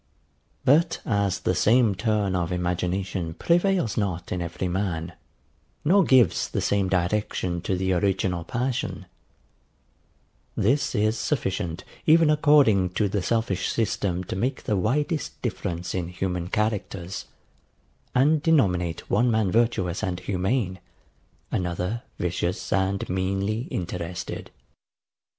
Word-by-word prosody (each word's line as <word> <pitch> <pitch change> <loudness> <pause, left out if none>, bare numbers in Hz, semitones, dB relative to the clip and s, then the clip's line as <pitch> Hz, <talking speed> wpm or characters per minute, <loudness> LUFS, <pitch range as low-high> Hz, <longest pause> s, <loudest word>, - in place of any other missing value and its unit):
But 150 +6 +4
as 100 -4 0
the - - +1
same 110 +3 +4
turn 100 -1 0
of 85 -1 -1
imagination 90 -1 -2
prevails 175 - +1
not 95 -5 -2
in 90 - -1
every 85 +2 -3
man, 90 -2 -2 0.7
nor 190 +5 +5
gives 130 -6 +4
the - - -2
same 100 -2 +1
direction 90 -1 0
to 95 +1 -1
the 95 0 0
original 90 -1 0
passion; 120 -5 -2 1.5
this 135 +6 +1
is 110 +2 +1
sufficient 95 - -2 0.2
even 160 0 +6
according 145 - +4
to 105 +2 +1
the 100 0 -1
selfish 110 -2 0
system 95 -5 -1
to - - -5
make 125 +7 -2
the 105 - 0
widest 145 - -1
difference 90 -7 -3
in 90 -2 -2
human 90 -1 -3
characters, 100 -3 -2 0.9
and 145 +4 +4
denominate 90 - +1
one 120 +4 +2
man 110 -4 +1
virtuous 110 -6 +1
and 90 -1 -2
humane, 95 +1 -1 0.7
another 90 +5 -2 0.2
vicious 90 +4 -2
and 95 0 0
meanly 100 +5 -1
interested. 85 0 -5
95 Hz, 120 wpm, -25 LUFS, 90-115 Hz, 1.5 s, even